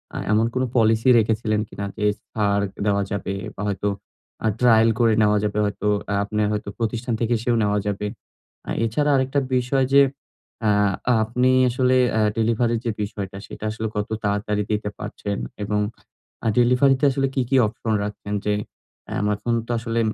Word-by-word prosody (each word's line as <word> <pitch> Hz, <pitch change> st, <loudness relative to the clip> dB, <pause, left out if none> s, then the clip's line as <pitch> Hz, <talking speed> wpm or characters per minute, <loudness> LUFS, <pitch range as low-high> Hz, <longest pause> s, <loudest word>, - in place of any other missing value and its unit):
আ -, -, -3 dB
এমন 110 Hz, +2 st, +3 dB
কোন 130 Hz, -, 0 dB
পলিসি 115 Hz, +2 st, +3 dB
রেখেছিলেন 110 Hz, -1 st, 0 dB
কিনা 100 Hz, -, -5 dB
যে 105 Hz, -, -1 dB, 0.3 s
ছাড় 100 Hz, -2 st, +1 dB, 0.2 s
দেওয়া 100 Hz, -1 st, +2 dB
যাবে 100 Hz, -1 st, -2 dB, 0.2 s
বা, 100 Hz, -, -7 dB
হয়তো 100 Hz, 0 st, -1 dB, 0.6 s
আ -, -, +4 dB
trial 115 Hz, -2 st, +5 dB
করে 115 Hz, -2 st, +4 dB
নেওয়া 105 Hz, 0 st, +4 dB
যাবে, 105 Hz, 0 st, -1 dB
হয়তো 105 Hz, 0 st, -2 dB, 0.2 s
আ -, -, +1 dB
আপনার 105 Hz, +1 st, -1 dB
হয়তো 105 Hz, -1 st, -3 dB
প্রতিষ্ঠান 115 Hz, +1 st, -2 dB
থেকে 115 Hz, 0 st, -1 dB
এসেও 120 Hz, +1 st, 0 dB
নেওয়া 105 Hz, 0 st, +1 dB
যাবে। 105 Hz, +1 st, -2 dB, 0.6 s
আ -, -, -1 dB
এছাড়া 145 Hz, +7 st, +1 dB
আরেকটা 135 Hz, +1 st, 0 dB, 0.2 s
বিষয় 130 Hz, +2 st, +1 dB
যে 140 Hz, -, +9 dB, 0.6 s
আ 105 Hz, -, +4 dB, 0.5 s
আপনি 125 Hz, +3 st, +1 dB, 0.2 s
আসলে 130 Hz, +1 st, +2 dB, 0.2 s
আ -, -, +3 dB, 0.2 s
ডেলিভারির 115 Hz, +1 st, +1 dB
যে 115 Hz, -, 0 dB
বিষয়টা, 100 Hz, -2 st, -5 dB
সেটা -, -, -9 dB
আসলে 110 Hz, 0 st, -3 dB
কত 105 Hz, -, -1 dB, 0.2 s
তাড়াতাড়ি 105 Hz, 0 st, 0 dB
দিতে 105 Hz, 0 st, -1 dB
পারছেন 100 Hz, -1 st, -4 dB, 0.3 s
এবং 105 Hz, +1 st, 0 dB, 0.7 s
আ -, -, +4 dB
ডেলিভারিতে 130 Hz, +3 st, +4 dB
আসলে 135 Hz, +1 st, 0 dB
কি, 135 Hz, -, +1 dB
কি 135 Hz, -, +4 dB
অপশন 110 Hz, +1 st, -3 dB
রাখছেন? 105 Hz, 0 st, -5 dB
যে, 105 Hz, -, +1 dB, 0.6 s
এম 105 Hz, -, 0 dB
এখন 115 Hz, +3 st, -2 dB
তো -, -, -12 dB
আসলে 115 Hz, 0 st, -1 dB
110 Hz, 170 wpm, -23 LUFS, 105-120 Hz, 0.7 s, যে